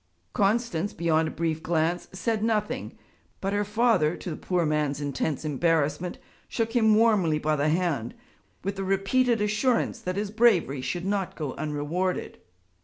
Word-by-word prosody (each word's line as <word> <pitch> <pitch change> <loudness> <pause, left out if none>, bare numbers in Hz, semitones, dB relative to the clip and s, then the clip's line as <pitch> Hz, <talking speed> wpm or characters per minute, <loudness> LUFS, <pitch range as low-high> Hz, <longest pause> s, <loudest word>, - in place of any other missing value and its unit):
Constance, 205 -3 +1
beyond 160 -1 +1
a - - -2
brief 160 -1 -2
glance, 165 +1 0
said 220 +3 -1
nothing; 215 -2 -1 0.4
but 195 +1 -2
her 205 0 +1
father, 210 -7 +2
to 180 - -6
the - - -3
poor 180 0 -1
man's 150 -2 0
intense 145 +1 -2
embarrassment, 155 +2 0 0.3
shook 225 0 -2
him 220 -3 +5
warmly 210 -8 +3
by 155 0 0
the 145 +1 +1
hand 155 -8 -1 0.5
with 195 +1 -3
the 195 - -2
repeated 210 +5 +2
assurance 215 +4 +1
that 185 0 -4
his 205 0 -2
bravery 205 - +3
should 175 +6 -3
not 195 -2 -1
go 150 -5 -4
unrewarded. 155 +5 -2
180 Hz, 155 wpm, -26 LUFS, 155-210 Hz, 0.5 s, him